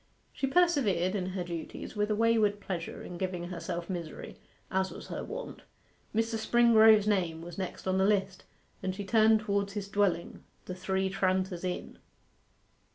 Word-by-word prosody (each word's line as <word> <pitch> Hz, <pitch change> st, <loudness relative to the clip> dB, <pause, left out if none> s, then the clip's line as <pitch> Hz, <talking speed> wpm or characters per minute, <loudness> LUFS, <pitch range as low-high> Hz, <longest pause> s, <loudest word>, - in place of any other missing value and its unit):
She 270 Hz, -, -1 dB
persevered 265 Hz, -, +2 dB
in 190 Hz, -3 st, -2 dB
her 185 Hz, -1 st, -3 dB
duties 170 Hz, +3 st, -6 dB
with 210 Hz, 0 st, 0 dB
a 215 Hz, -, +2 dB
wayward 220 Hz, -2 st, +3 dB
pleasure 180 Hz, -4 st, -5 dB
in 175 Hz, -1 st, -8 dB
giving 180 Hz, -2 st, -3 dB
herself 175 Hz, -1 st, -4 dB
misery, 170 Hz, -4 st, -6 dB, 0.3 s
as 190 Hz, 0 st, +1 dB
was -, -, -10 dB
her -, -, -4 dB
wont. -, -, -7 dB, 0.5 s
Mr. 225 Hz, 0 st, +1 dB
Springrove's 220 Hz, -2 st, +6 dB
name 175 Hz, -6 st, 0 dB
was 175 Hz, +2 st, -8 dB
next 190 Hz, 0 st, -5 dB
on 190 Hz, 0 st, +2 dB
the 190 Hz, -, +4 dB
list, 195 Hz, -2 st, 0 dB, 0.4 s
and 185 Hz, -1 st, -2 dB
she 200 Hz, 0 st, -5 dB
turned 220 Hz, +1 st, +4 dB
towards 200 Hz, -2 st, -1 dB
his 205 Hz, -2 st, -4 dB
dwelling, 200 Hz, -4 st, 0 dB, 0.2 s
the 185 Hz, -, -5 dB
Three 190 Hz, +1 st, -1 dB
Tranters 185 Hz, -1 st, 0 dB
Inn. 180 Hz, -1 st, -4 dB
190 Hz, 160 wpm, -30 LUFS, 180-215 Hz, 0.5 s, Springrove's